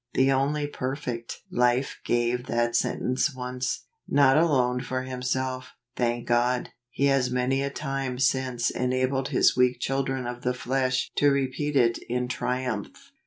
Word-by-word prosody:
The 130 +1 +4
only 140 +2 +1
perfect 130 -4 -5
Life 125 +2 +1
gave 120 +1 0
that 120 0 0
sentence 130 +3 0
once, 125 0 -3 0.2
not 135 -2 +5
alone 130 -6 +3
for 130 0 -3
Himself; 130 0 -3 0.2
thank 120 -1 -1
God, 120 +1 +1 0.2
He 140 - 0
has 135 -2 +3
many 125 +2 +1
a 140 - -1
time 135 -3 -3
since 130 -2 +1
enabled 130 +1 0
His - - +3
weak 125 0 +3
chil¬ 135 +1 0
dren 135 -1 -3
of 120 0 -5
the 125 0 -1
flesh 130 0 0
to 145 - +5
repeat 140 +2 -1
it 115 -3 +3
in 125 +1 -1
triumph. 125 -3 -3
130 Hz, 150 wpm, -26 LUFS, 125-135 Hz, 0.2 s, not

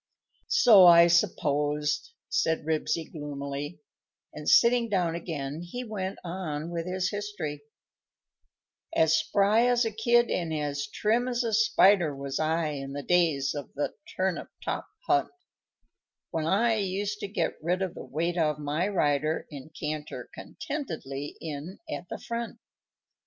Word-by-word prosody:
"So 200 -6 +7
I 170 0 +9
supposed," 150 - +1
said 160 - 0
Ribsy, 160 +1 -1
gloomily, 145 0 -5 0.5
and, - - -3
sitting 235 -1 +5
down 180 -5 +1
again, 155 -3 -4
he 210 +9 -6
went 195 -4 -4
on 170 -3 -4
with 170 0 -3
his 185 0 -1
history: 205 -8 -4 1.4
_As 160 -1 +4
spry 200 +8 +3
as 245 -1 +3
a 225 - -1
kid 235 +2 +3
and 170 -3 -1
as 145 -2 -2
trim 230 +4 0
as 245 -1 0
a 230 -2 -2
spider 195 -7 +4
Was 140 0 -4
I 160 0 +1
in 135 -2 -5
the 145 0 -5
days 160 -6 +2
of 145 -2 -7
the 145 - -2 0.2
Turnip 185 -1 -1 0.2
top - - -3 0.2
Hunt, - - +2 1.0
When 160 -1 -1
I 225 +5 +3
used 200 +1 -2
to - - -4
get 195 - -1
rid 180 +4 0
of 185 - -3
the - - -8
weight 170 +4 -2
of 150 -2 +1
my 150 +5 -1
rider 155 -5 +1
And 140 0 -9
canter 150 -1 -5
contentedly 170 - -6
in 155 +3 -6
at 180 - -6
the - - -4
front. 235 0 -5
170 Hz, 145 wpm, -28 LUFS, 150-205 Hz, 1.4 s, I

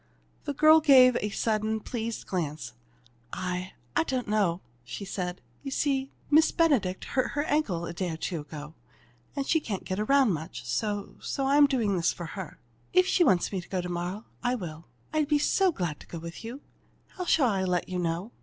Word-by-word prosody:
The 285 -1 -3
girl 310 +2 +7
gave 265 -5 +7
her - - 0
a 210 - -1
sudden, 215 +1 0
pleased 230 0 -4
glance. 160 -5 -3 0.6
"I 180 0 -3 0.2
I - - +4
don't 255 -5 -2
know," 200 -4 +1 0.2
she 200 +11 -7
said. 180 -2 -4 0.2
"You 275 - -5
see, 270 -1 0 0.2
Miss 315 +2 +6
Benedict 260 - +2
hurt 255 - -1
her 290 - 0
ankle 275 - 0
a 170 - -5
day 180 +1 -2
or 160 - -4
two 170 0 -3
ago, 150 0 -9 0.6
and 280 -1 -1
she 320 - +3
can't 210 -10 -4
get 190 +1 -3
around 260 0 +4
much, 160 +3 -6
so 205 -2 -2
so 275 - -2
I'm 285 +1 +6
doing 225 -8 +1
this 170 - +2
for 175 - -7
her. 180 0 -7 0.3
If 365 0 +6
she 370 -1 +3
wants 190 - +3
me 190 -3 -2
to - - -16
go 190 - -1
to 180 0 -4
morrow, 175 +5 -4 0.2
I 245 0 +1
will. 165 -7 -7 0.3
I'd 310 -2 +2
be 300 0 +3
so 375 +5 +3
glad 175 - -3
to - - -14
go 170 - -7
with 165 +4 -8
you. 240 +5 -7 0.5
How 365 - -6
shall 285 -7 +4
I 195 -3 0
let 180 -1 0
you 185 -1 -3
know?" 175 +5 -2
210 Hz, 205 wpm, -28 LUFS, 180-275 Hz, 0.6 s, girl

